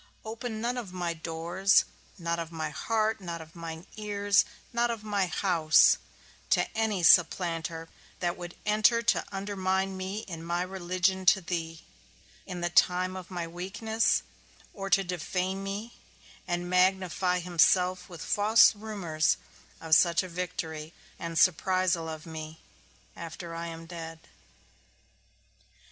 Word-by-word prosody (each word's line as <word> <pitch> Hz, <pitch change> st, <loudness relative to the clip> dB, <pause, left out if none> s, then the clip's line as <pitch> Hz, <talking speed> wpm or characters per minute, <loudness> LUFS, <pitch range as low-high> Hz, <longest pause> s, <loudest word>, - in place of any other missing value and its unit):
Open 220 Hz, 0 st, -5 dB
none 245 Hz, +2 st, -1 dB
of 210 Hz, -7 st, -7 dB
my 175 Hz, -2 st, -2 dB
doors, 170 Hz, +4 st, +2 dB, 0.3 s
not 170 Hz, -1 st, -2 dB
of 165 Hz, 0 st, -5 dB
my 160 Hz, -2 st, -4 dB
heart, 220 Hz, +6 st, 0 dB
not 170 Hz, -2 st, -5 dB
of 160 Hz, +1 st, -12 dB
mine 165 Hz, 0 st, -7 dB
ears, 205 Hz, -1 st, +2 dB, 0.3 s
not 235 Hz, 0 st, +2 dB
of 230 Hz, -2 st, -4 dB
my 205 Hz, -3 st, 0 dB
house, 165 Hz, -3 st, +4 dB, 0.5 s
to -, -, +3 dB
any 215 Hz, -5 st, 0 dB
supplanter 165 Hz, -1 st, +3 dB, 0.3 s
that 175 Hz, 0 st, -1 dB
would 175 Hz, -1 st, -8 dB
enter 215 Hz, +2 st, +3 dB
to -, -, +2 dB
undermine 195 Hz, -1 st, -1 dB
me 190 Hz, +3 st, -4 dB
in 165 Hz, -5 st, -8 dB
my 175 Hz, +1 st, -1 dB
religion 185 Hz, +1 st, -1 dB
to 195 Hz, -, +7 dB
thee, 165 Hz, -2 st, -4 dB, 0.7 s
in 180 Hz, -2 st, -5 dB
the 175 Hz, -, 0 dB
time 180 Hz, +1 st, +3 dB
of 185 Hz, -2 st, -8 dB
my 175 Hz, -3 st, -4 dB
weakness, 220 Hz, +6 st, 0 dB, 0.5 s
or 195 Hz, -1 st, -5 dB
to 195 Hz, -, +4 dB
defame 185 Hz, +2 st, -2 dB
me, 205 Hz, +4 st, -5 dB, 0.5 s
and 175 Hz, 0 st, -2 dB
magnify 185 Hz, 0 st, +2 dB
himself 180 Hz, +1 st, +2 dB
with 170 Hz, -3 st, -8 dB
false 215 Hz, +2 st, +5 dB
rumours 195 Hz, -7 st, 0 dB, 0.4 s
of 160 Hz, -1 st, -2 dB
such 170 Hz, +1 st, +5 dB
a -, -, -6 dB
victory 170 Hz, -3 st, -5 dB, 0.3 s
and 165 Hz, -1 st, -4 dB
surprisal 185 Hz, -2 st, +2 dB
of 155 Hz, -1 st, -7 dB
me, 160 Hz, -1 st, -8 dB, 0.6 s
after 165 Hz, 0 st, -7 dB
I 170 Hz, 0 st, -4 dB
am 165 Hz, 0 st, -8 dB
dead. 165 Hz, -1 st, -8 dB
180 Hz, 135 wpm, -29 LUFS, 165-195 Hz, 0.7 s, to